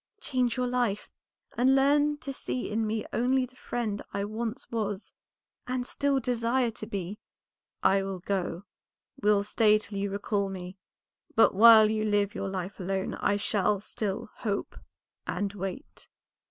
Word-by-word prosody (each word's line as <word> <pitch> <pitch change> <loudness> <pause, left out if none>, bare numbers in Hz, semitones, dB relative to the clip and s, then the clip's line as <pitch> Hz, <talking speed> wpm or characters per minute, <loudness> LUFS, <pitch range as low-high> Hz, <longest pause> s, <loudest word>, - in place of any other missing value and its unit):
Change 250 -3 0
your 250 - +1
life, 245 -5 -1 0.4
and 260 +3 +4
learn 290 +2 +3
to 280 -2 -6
see 255 -3 -4
in 220 +1 0
me 215 0 -2
only 255 +2 +2
the 255 0 -19
friend 225 -5 -3
I 200 - -2
once 225 +4 -4
was 210 -3 -3 0.5
and 250 0 -1
still 280 +1 0
desire 240 0 +1
to 215 - -8
be." 200 -1 -5 0.6
"I 195 0 +4
will 195 -1 -4
go, 180 -1 -2 0.6
will 205 -1 +4
stay 215 +1 +4
till 210 -1 -6
you 200 0 -1
recall 200 0 -1
me, 185 -1 -7 0.6
but 225 - +6
while 220 +1 +9
you 215 0 0
live 205 -1 +1
your 195 - -3
life 190 +1 -5
alone 190 +1 -2
I 205 - +1
shall 205 0 +1
still 205 0 -4
hope 200 -3 -3 0.5
and 200 -1 -2
wait." 195 - -7
215 Hz, 155 wpm, -28 LUFS, 200-245 Hz, 0.6 s, while